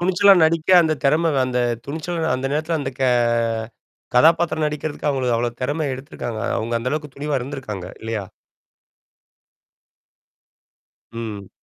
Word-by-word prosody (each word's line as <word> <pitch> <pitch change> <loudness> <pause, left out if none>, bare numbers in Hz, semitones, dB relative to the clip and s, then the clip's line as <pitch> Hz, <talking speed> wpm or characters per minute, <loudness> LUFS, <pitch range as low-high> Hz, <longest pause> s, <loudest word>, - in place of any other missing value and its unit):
துணிச்சலா 190 +3 +5
நடிக்க 165 +2 +1
அந்த 155 -1 +1
திறம 160 +4 +3
அந்த 125 -1 -1 0.3
துணிச்சலா 160 +2 -3
அந்த 130 +1 -3
நேரத்தில 155 +2 0
அந்த 135 -1 -3
க - - +1 1.1
கதாபாத்திரம் 160 +3 +4
நடிக்கிறதுக்கு 150 0 -3
அவங்க 130 -3 0
அவ்வளவு 120 +1 -2
திறமை 150 +4 -1
எடுத்திருக்காங்க. 120 -4 -6 0.2
அவுங்க 115 +2 -2
அந்த 120 +2 -3
அளவுக்கு 150 -3 -4
துணிவா 145 -1 -1
இருந்திருக்காங்க, 120 -8 -6
இல்லையா? 110 -3 -3 2.9
ம். 110 -4 -6
145 Hz, 120 wpm, -21 LUFS, 120-160 Hz, 2.9 s, துணிச்சலா